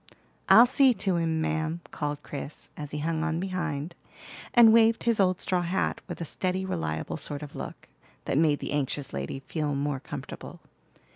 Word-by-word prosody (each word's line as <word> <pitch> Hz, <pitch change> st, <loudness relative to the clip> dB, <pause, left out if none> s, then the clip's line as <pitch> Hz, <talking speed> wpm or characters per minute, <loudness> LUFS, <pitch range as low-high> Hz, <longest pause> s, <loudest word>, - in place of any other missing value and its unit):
"I'll 235 Hz, -, +9 dB
see 260 Hz, 0 st, +4 dB
to 190 Hz, -5 st, 0 dB
him, 160 Hz, -1 st, 0 dB
ma'am," 160 Hz, +1 st, -1 dB
called 145 Hz, -1 st, -3 dB
Chris, 145 Hz, +1 st, -7 dB
as 150 Hz, -1 st, -6 dB
he 150 Hz, -, -5 dB
hung 160 Hz, +1 st, -1 dB
on 165 Hz, 0 st, -1 dB
behind, 170 Hz, -4 st, -3 dB, 0.6 s
and 230 Hz, -2 st, +8 dB
waved 225 Hz, 0 st, +5 dB
his 230 Hz, -2 st, +2 dB
old 185 Hz, -2 st, +3 dB
straw 180 Hz, -1 st, 0 dB
hat, 175 Hz, +2 st, -1 dB
with -, -, -6 dB
a 170 Hz, -, -3 dB
steady, 185 Hz, +4 st, -2 dB
reliable 80 Hz, -, -3 dB
sort 145 Hz, -1 st, -4 dB
of 145 Hz, -, -9 dB
look, -, -, -7 dB, 0.4 s
that -, -, -1 dB
made 155 Hz, -2 st, +3 dB
the -, -, -4 dB
anxious 145 Hz, -1 st, -2 dB
lady 70 Hz, -, -4 dB
feel 150 Hz, +1 st, -2 dB
more 140 Hz, -1 st, -1 dB
comfortable. -, -, -8 dB
160 Hz, 175 wpm, -27 LUFS, 145-185 Hz, 0.6 s, I'll